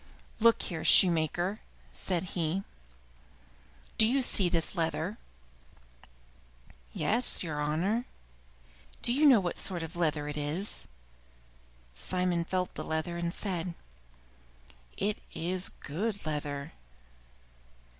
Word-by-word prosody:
"Look 230 +1 +4
here, 165 -3 -3
shoemaker," 175 +3 +5 0.3
said 180 -1 -2
he, 175 +2 -1 1.4
"do 220 - +8
you 265 +3 +2
see 195 -6 +5
this 165 -2 0
leather?" 165 +4 -1 1.7
"Yes, 235 - +1
your 150 -3 -3
honor." 180 +11 0 0.9
"But - - -24
do 240 - +2
you 295 +3 +5
know 255 -6 +8
what 180 -3 -2
sort 175 -4 -1
of 165 +2 -7
leather 155 -3 0
it 150 0 -4
is?" 150 +8 -1 1.1
Simon 180 - -1
felt 180 0 -2
the - - -5
leather 160 +2 -2
and 170 0 -2
said, 175 -3 -3 1.2
"It 210 +1 -1 0.2
is 180 +3 -1
good 200 +7 -4
leather." 145 -1 -3
175 Hz, 110 wpm, -30 LUFS, 160-200 Hz, 1.7 s, do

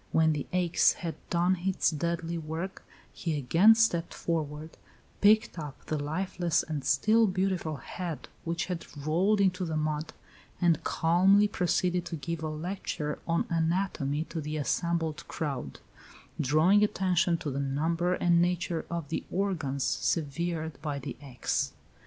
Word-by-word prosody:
When 160 -1 +4
the 145 -2 -4
axe 180 -2 +3
had 165 -3 -4 0.2
done 180 +2 +2
its 190 0 +1
deadly 170 +2 -2
work, 165 +4 -5 0.3
he 160 -3 -2
again 165 - +6
stepped 175 -7 +1
forward, 155 -1 -3 0.5
picked 215 -2 +4
up 150 -3 -8
the 155 - -2
lifeless 175 +2 0
and 150 -3 -4
still 215 - +4
beautiful 185 -4 -1
head 165 +4 -6 0.2
which 170 0 -2
had 180 -2 -5
rolled 175 +9 +2
into 190 -1 +2
the 160 -3 -2
mud, 155 0 -2 0.5
and 170 -4 +2
calmly 190 +5 +4
proceeded 180 -2 0
to 170 - -4
give 160 +2 -4
a 155 - -2
lecture 155 -1 -4
on 170 0 +1
anatomy 165 -3 0
to 165 - -4
the 150 +1 -4
assembled 165 +1 -1
crowd, 140 - -4 0.6
"drawing 155 +9 +4
attention 180 -4 +2
to 150 - -4
the 135 - -3
number 165 +6 0
and 170 -1 +3
nature 175 -1 -1
of 170 -4 -4
the 160 - -2
organs 165 -9 -1
severed 160 0 -1
by 150 -2 -3
the 140 -1 -6
axe." 130 -4 -2
165 Hz, 145 wpm, -29 LUFS, 155-180 Hz, 0.6 s, again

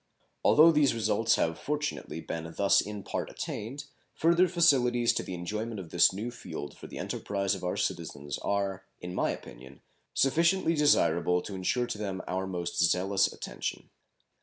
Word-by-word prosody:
Although 160 +2 +7
these 150 -5 +3
results 110 0 +2
have 80 0 0
fortunately 145 - -3
been 80 0 -5
thus 100 -1 +4
in 105 -1 -6
part - - -3
attained, 135 +8 -6 0.3
further 170 +3 +4
facilities 130 -9 +3
to - - -1
the 90 - -6
enjoyment 105 +5 -4
of 85 -4 -9
this 85 - +5
new 105 +6 -4
field 75 -10 -7
for - - -11
the - - -9
enterprise 100 -1 -2
of 95 - -6
our 90 - -2
citizens 70 -1 -3
are, 100 -1 -1 0.2
in 90 0 -7
my - - 0
opinion, 65 +3 -9 0.3
sufficiently 170 +5 +3
desirable 90 - +3
to 100 - -7
insure 95 +6 0
to 105 - -5
them 95 -3 -4
our 95 +1 -2
most 90 -2 -3
zealous 95 +3 +2
attention. - - -6
100 Hz, 160 wpm, -29 LUFS, 90-130 Hz, 0.3 s, Although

